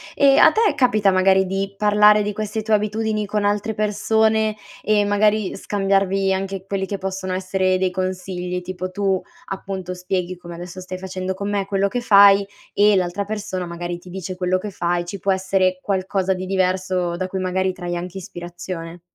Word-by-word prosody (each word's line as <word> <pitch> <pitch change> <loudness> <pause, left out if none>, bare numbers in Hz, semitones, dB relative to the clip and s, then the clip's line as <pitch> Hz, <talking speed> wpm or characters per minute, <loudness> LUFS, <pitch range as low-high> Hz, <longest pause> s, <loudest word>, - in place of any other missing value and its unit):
E 275 -1 +5
a - - +8
te 440 -1 +2
capita, 215 -6 +3
magari, 190 +1 +4
di 195 +1 -3
parlare 210 0 +5
di 210 - -2
queste 215 +1 -3
tue 220 0 -1
abitudini 215 0 0
con 210 0 -1
altre 205 +2 0
persone 220 +1 +1 0.3
e, 210 0 +2
magari, 205 0 +2
scambiarvi 195 -1 +1
anche 190 0 -4
quelli 195 -1 -2
che 200 - -3
possono 190 -1 -4
essere 185 0 0
dei 185 0 0
consigli? 180 -1 -3
Tipo, 185 0 -5
tu, 195 -1 0 0.3
appunto, 190 -2 -5
spieghi, 180 0 -3
come 175 -1 -10
adesso 175 +2 -8
stai 185 0 -6
facendo 185 0 -4
con 200 +2 -4
me, 200 -1 0
quello 195 0 +1
che 245 - -2
fai 200 -3 +7 0.3
e 205 0 +4
l'altra 185 +2 -1
persona 200 -3 -4
magari 175 0 -5
ti 180 - -14
dice 185 0 -6
quello 180 0 0
che 205 +2 -6
fa, 175 -1 -1
e 175 - -4
ci 195 +3 -6
può 195 +2 +1
essere 190 -1 +1
qualcosa 190 -1 0
di 185 0 -5
diverso 185 -2 0
da 185 +1 -2
cui, 190 +1 -4
magari, 185 0 0
trai 175 -1 -4
anche 180 +2 -6
ispirazione? 175 -1 -7
190 Hz, 185 wpm, -21 LUFS, 185-205 Hz, 0.3 s, a